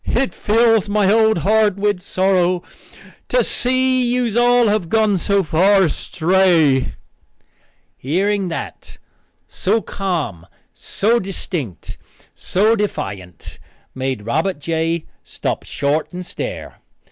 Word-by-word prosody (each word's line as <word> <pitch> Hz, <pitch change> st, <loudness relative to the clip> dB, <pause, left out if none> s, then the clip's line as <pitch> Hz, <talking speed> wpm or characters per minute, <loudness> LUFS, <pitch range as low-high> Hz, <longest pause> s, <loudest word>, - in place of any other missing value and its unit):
"It 260 Hz, +2 st, 0 dB
fills 225 Hz, -1 st, +2 dB
my 205 Hz, -1 st, +2 dB
old 220 Hz, -2 st, +3 dB
heart 215 Hz, -1 st, +3 dB
with 205 Hz, -1 st, 0 dB
sorrow 185 Hz, -1 st, +1 dB, 0.7 s
to -, -, +3 dB
see 255 Hz, 0 st, +1 dB
that 240 Hz, -, 0 dB, 0.2 s
yous 225 Hz, -2 st, -3 dB
all 240 Hz, 0 st, +4 dB
have 205 Hz, -5 st, 0 dB
gone 215 Hz, -3 st, +2 dB
so 200 Hz, +2 st, +1 dB
far 190 Hz, +5 st, +3 dB
astray." 165 Hz, -4 st, +2 dB, 1.0 s
Hearing 195 Hz, +7 st, 0 dB
that, 165 Hz, -, -7 dB, 0.5 s
so 225 Hz, -, 0 dB
calm, 155 Hz, -, -4 dB, 0.3 s
so 230 Hz, +4 st, 0 dB
distinct, 175 Hz, -, -6 dB, 0.3 s
so 215 Hz, +5 st, +1 dB
defiant, 95 Hz, -, -5 dB, 0.3 s
made 130 Hz, -5 st, -4 dB
Robert 160 Hz, +9 st, -1 dB
J. 165 Hz, +2 st, -2 dB, 0.2 s
stop -, -, -4 dB
short 145 Hz, +3 st, -1 dB
and 180 Hz, 0 st, -7 dB
stare. -, -, -7 dB
190 Hz, 110 wpm, -19 LUFS, 160-215 Hz, 1.0 s, all